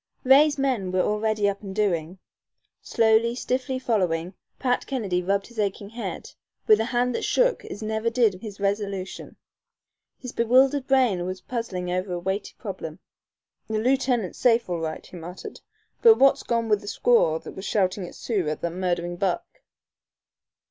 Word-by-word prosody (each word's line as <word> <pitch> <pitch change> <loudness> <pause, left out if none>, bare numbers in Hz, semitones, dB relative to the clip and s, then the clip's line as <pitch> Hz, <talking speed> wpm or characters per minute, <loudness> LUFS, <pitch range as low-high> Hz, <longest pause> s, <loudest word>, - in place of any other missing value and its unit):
Ray's 290 +3 +6
men 250 -9 0
were 185 0 +2
already 210 0 +1
up 200 0 -2
and 195 -2 -7
doing. 180 -4 0 0.6
Slowly, 225 +1 +2
stiffly 260 +1 -2
following, 185 -8 0 0.2
Pat 250 -2 0
Kennedy 205 -10 -1
rubbed 195 +2 0
his 235 -2 -11
aching 200 0 -2
head, 235 +1 -6 0.3
with 215 -1 +6
a 220 - +1
hand 245 +1 0
that - - -2
shook - - +2
as 210 - -7
never 220 +1 -1
did 225 -6 +1
his 205 -3 -8
resolution. 200 -1 -3 0.8
His 250 - -8
bewildered 260 +4 +3
brain 240 -10 +2
was 185 0 -5
puzzling 185 -7 -4
over 185 +1 -2
a 175 - -2
weighty 190 +3 -3
problem. - - -6 0.7
"The 220 - -2
lieutenant's 245 -4 0
safe 235 -1 +3
all 170 - -1
right," 160 -1 -4
he 180 - -11
muttered, 175 +2 -9 0.4
"but 455 -2 +8
what's 275 0 +5
gone 230 -1 -1
wid 210 -2 +3
the 205 - -11
squaw 205 -8 +3
that - - -8
was 190 - -8
shoutin' 185 -2 0
Sioux 195 -9 -2
at 155 - -4
that 170 - -2
murdherin' 175 -1 -2
buck?" 185 -1 0
210 Hz, 160 wpm, -25 LUFS, 185-240 Hz, 0.8 s, but